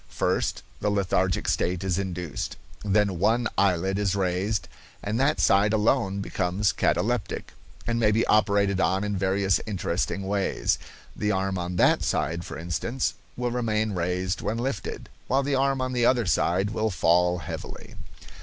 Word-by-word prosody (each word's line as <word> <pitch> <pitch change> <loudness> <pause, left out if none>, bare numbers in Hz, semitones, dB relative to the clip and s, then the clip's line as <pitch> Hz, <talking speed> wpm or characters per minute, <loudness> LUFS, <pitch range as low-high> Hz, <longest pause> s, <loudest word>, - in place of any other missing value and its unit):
First, - - -1 0.2
the 105 - 0
lethargic 95 -2 0
stage 90 +1 0
is 95 -1 0
induced, 90 -6 -4 0.3
then 100 -3 +1
one 115 +5 +2
eyelid 95 0 +1
is 100 -2 +1
raised, 95 +2 0 0.4
and 105 +3 -1
that 140 +3 +2
side 100 +2 +4
alone 105 -2 +1
becomes 95 0 0
cataleptic, 120 +6 -1 0.3
and 115 0 0
may 110 -2 +4
be 110 +2 +2
operated 100 -2 +3
on 95 +2 +1
in 105 -1 -1
various 95 0 +1
interesting 95 -1 -2
ways. 100 -1 0 0.4
The 105 - 0
arm 95 -1 -1
on 90 0 -3
that - - +4
side, 85 +2 -1
for 70 - -7
instance, 90 +10 -2 0.2
will 125 0 -1
remain 110 -3 0
raised 90 +1 -1
when 110 - -2
lifted, 115 -5 -4 0.2
while 135 +2 +2
the 140 +1 -1
arm 135 0 +2
on 130 0 -2
the 120 -1 +3
other 120 -3 +3
side 95 +2 +1
will 110 0 0
fall 90 0 +3
heavily. 80 - -7
100 Hz, 155 wpm, -26 LUFS, 90-110 Hz, 0.4 s, side